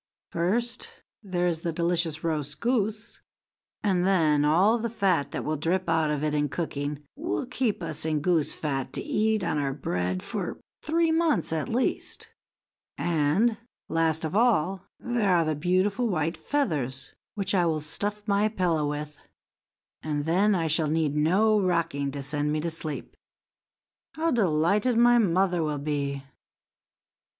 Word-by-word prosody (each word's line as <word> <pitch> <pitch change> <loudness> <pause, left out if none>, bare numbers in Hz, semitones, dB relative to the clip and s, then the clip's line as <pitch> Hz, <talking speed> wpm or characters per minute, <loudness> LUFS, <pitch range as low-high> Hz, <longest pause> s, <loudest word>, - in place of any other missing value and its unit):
First, 225 +8 -1 0.3
there 180 -4 -1
is 170 -2 0
the 170 +1 -2
delicious 170 -1 0
roast 150 -2 -2
goose, 220 -2 -1 0.6
and 190 -4 +2
then 160 -6 +3
all 185 +10 +4
the 235 +1 -2
fat 195 -10 +1
that - - -5
will 155 +1 -1
drip 175 +5 0
out 160 -1 +2
of 150 -1 -1
it 150 -1 0
in 150 -1 +1
cooking 145 -2 -4
will 300 -1 -2
keep 245 -7 -1
us 160 -2 -4
in 155 -1 0
goose 160 -1 +1
fat 135 -4 -3
to - - -2
eat 215 -1 +1
on 155 -3 0
our 140 -1 -1
bread 90 -7 -2
for - - -4 0.2
three 330 +1 +1
months, 320 - +1
at 155 -2 -2
least; 250 +3 -1 0.7
and, 175 +8 +1 0.3
last 160 0 +1
of 160 - -3
all, 195 -5 +2
there 230 -6 +1
are 165 -1 +3
the 155 - 0
beautiful 185 - +1
white 165 -4 -1
feathers, 135 - -2 0.2
which 200 -1 -2
I 180 -3 +3
will 160 -2 0
stuff 205 +7 -4
my 205 +1 +3
pillow 170 -8 0
with, 150 0 -6 0.8
and 150 -2 -2
then 195 +5 +3
I 165 -3 0
shall 160 -1 +2
need 155 -2 0
no 200 +8 +3
rocking 170 -6 0
to 140 0 -5
send 145 +1 -1
me 155 - 0
to 170 +1 -2
sleep. 155 -2 -5 1.0
How 325 +1 0
delighted 205 - +2
my 240 0 +6
mother 180 -3 +2
will 150 -2 -1
be!" 140 -1 -2
170 Hz, 155 wpm, -27 LUFS, 150-210 Hz, 1.0 s, my